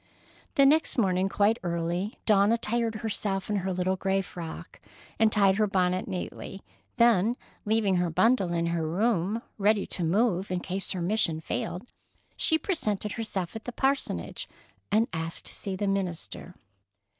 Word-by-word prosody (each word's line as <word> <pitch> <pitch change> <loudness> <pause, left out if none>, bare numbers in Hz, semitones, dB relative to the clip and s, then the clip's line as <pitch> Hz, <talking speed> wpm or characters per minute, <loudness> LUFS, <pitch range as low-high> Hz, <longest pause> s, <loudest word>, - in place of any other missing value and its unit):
The 275 -3 +6
next 305 +2 +3
morning 190 -4 +2
quite 210 +4 +2
early, 175 +3 -2
Dawn 205 -1 +5
attired 230 0 +1
herself 210 -2 -2
in 205 - +1
her 190 0 -1
little 185 +1 0
gray 195 0 0
frock 170 -3 -8 0.4
and 220 -1 +5
tied 195 -3 +4
her 215 -1 +3
bonnet 185 -1 +1
neatly, 190 +1 -6 0.3
then, 235 0 +4 0.3
leaving 210 -3 +2
her 175 -1 +1
bundle 195 +1 +3
in 170 -1 0
her 165 -2 -1
room, 205 +3 0 0.2
ready 205 0 +3
to 180 - -5
move 190 +2 +1
in 180 -1 -1
case 190 +2 -4
her 180 -2 -3
mission 175 -4 +1
failed, 180 +6 -4 0.4
she 320 - +3
presented 215 - -2
herself 205 -5 -4
at 220 - -7
the 245 - -4
parsonage 270 +3 -1 0.4
and 220 +3 +3
asked 165 0 -3
to - - -2
see 195 -2 -3
the 205 - -2
minister. 185 -2 -3
195 Hz, 155 wpm, -28 LUFS, 180-220 Hz, 0.4 s, The